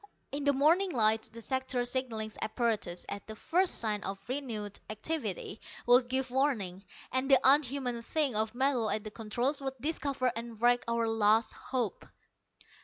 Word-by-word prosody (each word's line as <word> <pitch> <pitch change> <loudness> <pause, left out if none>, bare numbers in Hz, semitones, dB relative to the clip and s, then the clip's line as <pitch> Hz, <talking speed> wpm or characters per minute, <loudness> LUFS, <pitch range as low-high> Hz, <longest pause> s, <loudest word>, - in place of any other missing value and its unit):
In 285 0 -3
the 285 - +5
morning 325 +8 +4
light, 220 -6 +2
the 230 0 -10
sector 260 -1 -1
signalling 240 -3 -1
apparatus, 220 -6 -1
at 200 - -6
the 220 - -7
first 355 - +1
sign 210 -3 -1
of 195 - -3
renewed 230 -6 -4
activity, 220 - -3 0.2
would 245 +1 +6
give 260 0 0
warning, 220 -9 0 0.3
and 260 +2 0
the 270 -2 +7
unhuman 265 -3 +3
thing 280 0 0
of 220 +1 0
metal 255 -4 +2
at 215 - 0
the 215 - -6
controls 240 +6 -2
would 270 -1 -3
discover 280 -3 0
and 230 -1 -6
wreck 245 +1 +4
our 230 0 +1
last 225 0 +3
hope. 245 -7 -3
245 Hz, 160 wpm, -31 LUFS, 220-270 Hz, 0.3 s, the